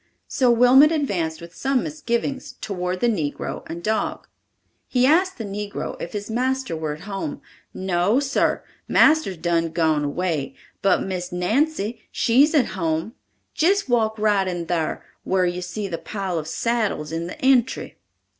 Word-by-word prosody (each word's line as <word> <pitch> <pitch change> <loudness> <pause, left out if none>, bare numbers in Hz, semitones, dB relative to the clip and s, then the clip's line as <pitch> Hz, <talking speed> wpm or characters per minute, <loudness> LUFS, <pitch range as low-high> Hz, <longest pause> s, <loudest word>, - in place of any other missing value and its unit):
So 255 -2 +2
Wilmot 250 +5 +6
advanced 180 - -1
with 170 0 -11
some 270 +3 0
misgivings 275 -3 -3
toward 180 -2 -4
the 240 - +3
negro 160 -11 -2
and 170 +1 -7
dog. 220 0 -1 0.6
He 250 -1 +2
asked 365 +7 +3
the 230 - -4
negro 205 0 -5
if 170 - -6
his 205 -1 -4
master 255 -3 -1
were 155 -2 -3
at 155 - -14
home. 210 +9 -5 0.3
"No, 190 +5 +1
sar, 280 -1 0 0.2
marster's 310 - +4
done 165 0 0
gone 160 -2 +1
away, 150 -1 -2 0.3
but 195 - +3
Miss 185 -1 -4
Nancy, 225 - 0
she's 275 +7 +3
at 275 -5 +3
home. 165 +3 -1 0.4
Jist 385 0 +2
walk 220 -2 +2
right 205 -3 +2
in 175 -2 -3
thar, 165 -2 -2 0.2
whar 185 -1 +1
you 175 0 -2
see 180 +3 -4
the 170 -3 -4
pile 190 -5 -3
of 155 - -7
saddles 215 -7 -1
in 165 +1 -3
the - - -8
entry." 260 -1 +1
200 Hz, 155 wpm, -23 LUFS, 175-255 Hz, 0.6 s, Wilmot